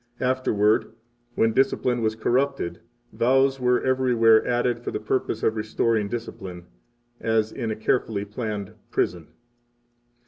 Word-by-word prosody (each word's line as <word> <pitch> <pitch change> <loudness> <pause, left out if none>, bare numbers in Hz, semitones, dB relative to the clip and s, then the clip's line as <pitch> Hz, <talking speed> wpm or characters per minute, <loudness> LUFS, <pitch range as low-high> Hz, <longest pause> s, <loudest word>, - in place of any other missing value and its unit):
Afterward, 110 -5 +1 0.4
when 115 0 +2
discipline 125 -2 +1
was 110 -1 0
corrupted, 125 -7 0 0.3
vows 135 +2 +2
were 125 0 +2
everywhere 120 -4 +4
added 120 -1 +1
for 120 - -5
the - - -3
purpose 110 0 -2
of 110 - +2
restoring 110 0 0
discipline, 95 -6 -6 0.5
as 110 -1 +1
in 115 -4 -4
a 110 - -2
carefully 110 -2 -1
planned 105 -1 -5 0.2
prison. 85 -3 -1
115 Hz, 125 wpm, -24 LUFS, 105-125 Hz, 0.5 s, everywhere